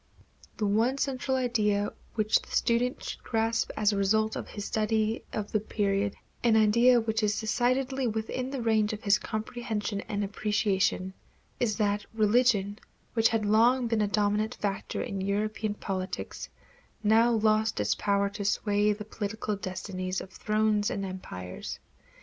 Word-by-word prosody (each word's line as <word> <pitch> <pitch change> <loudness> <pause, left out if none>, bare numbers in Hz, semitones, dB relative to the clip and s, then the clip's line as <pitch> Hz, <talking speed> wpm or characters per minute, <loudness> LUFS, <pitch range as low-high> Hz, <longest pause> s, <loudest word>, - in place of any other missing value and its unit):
The 215 - 0
one 225 +6 +2
central 265 -1 -1
idea 210 -5 +1 0.2
which 215 -1 +3
the - - -16
student 240 +2 +1
should - - -6
grasp 225 0 0
as 210 -1 +3
a - - -1
result 215 +2 +2
of - - -5
his 205 -1 -6
study 220 +1 0
of 210 -1 -4
the 215 - +2
period 200 -1 -1 0.3
an 230 -2 +4
idea 235 +3 +5
which 220 0 -1
is 210 -1 +1
decidedly 255 +4 0
within 225 +3 -2
the 265 -3 -4
range 220 -2 +2
of 215 - -7
his 200 0 +4
comprehension 220 -2 -3
and 205 -2 -1
appreciation 200 -2 0 0.5
is 220 -4 +1
that 205 -2 0
religion, 215 -2 +3 0.3
which 225 -1 +4
had 225 -2 0
long 235 +5 +4
been 225 -2 +1
a 210 - +2
dominant 210 +1 +1
factor 200 -1 -3
in 195 -1 -4
European 210 +2 -1
politics, 190 -2 -4 0.5
now 225 +3 +5
lost 220 - +2
its 105 0 +2
power 200 0 +1
to 205 0 -6
sway 205 +1 +2
the 210 0 -8
political 215 0 -3
destinies 185 -1 -4
of 190 - -9
thrones 215 0 +1
and 195 0 -3
empires. 90 - -7
215 Hz, 155 wpm, -28 LUFS, 205-225 Hz, 0.5 s, idea